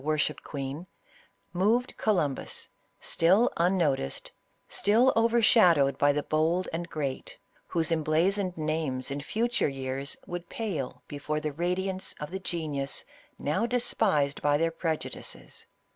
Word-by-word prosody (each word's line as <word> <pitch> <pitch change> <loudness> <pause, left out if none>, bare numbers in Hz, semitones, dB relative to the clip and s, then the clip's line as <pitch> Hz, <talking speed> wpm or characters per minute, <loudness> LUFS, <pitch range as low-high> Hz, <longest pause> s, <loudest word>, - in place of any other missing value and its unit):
worshipped 150 -1 0
queen, 140 +4 -5 0.7
moved 220 +8 +1
Columbus, 160 -11 -1 0.3
still 190 +9 +3
unnoticed, 170 - +1 0.4
still 235 +6 +3
overshadowed 220 - +5
by 145 - +5
the 145 0 -1
bold 165 +4 +1
and 170 +1 -3
great, 140 -4 -4 0.3
whose 165 -1 +1
em 165 -1 +2
'blazoned 180 +4 +1
names 155 -5 -1
in 140 +1 -3
future 235 - 0
years 135 +1 -4
would 175 0 -6
pale 180 - -4
before 150 +1 -3
the 150 -1 -3
radiance 185 +4 -1
of 150 +1 -6
the 190 - -3
genius 155 -7 -3 0.3
now 190 +11 0
despised 200 - +1
by 145 0 +3
their 165 +2 +1
preju 165 -1 -2
dices. - - -8
165 Hz, 130 wpm, -28 LUFS, 145-190 Hz, 0.7 s, overshadowed